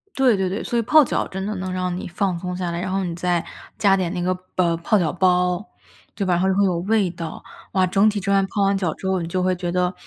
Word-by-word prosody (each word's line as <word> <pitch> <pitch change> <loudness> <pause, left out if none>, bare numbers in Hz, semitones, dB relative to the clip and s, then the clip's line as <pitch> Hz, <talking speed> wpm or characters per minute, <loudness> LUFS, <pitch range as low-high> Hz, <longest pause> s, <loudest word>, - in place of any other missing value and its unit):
对 260 -5 +4
对 190 -1 0
对， 195 +4 -3
所 235 - -1
以 - - +2
泡 305 +6 +6
脚 - - -1
真 190 +1 -5
的 215 - -2
能 185 0 -4
让 180 -1 -2
你 180 - -5
放 180 0 -1
松 180 0 -4
下 180 -2 -3
来， 170 - -3
然 185 - -3
后 195 0 -1
你 175 - -3
再 175 -1 0 0.3
加 195 -2 +4
点 180 -2 -1
那 175 - -3
个 185 +1 +1 0.2
卜 170 -2 +2
泡 170 +6 +2
脚 165 -5 +1
包， 180 0 +2 0.5
对 200 -1 -2
吧， 180 - +2
然 175 - 0
后 190 - +2
就 190 - +2
会 200 - +3
有 185 -3 +1
味 200 0 +1
道， 165 -2 -7 0.3
哇， 185 -1 +3
整 195 +4 +3
体 210 - -3
这 200 0 -1
完 195 -1 +3
泡 200 - -2
完 195 0 +2
脚 180 -5 -1
之 - - -11
后， 190 -2 0
你 165 - -4
就 180 +2 -1
会 185 0 +2
觉 175 -1 -3
得 180 +1 0
185 Hz, 310 characters per minute, -22 LUFS, 180-195 Hz, 0.5 s, 泡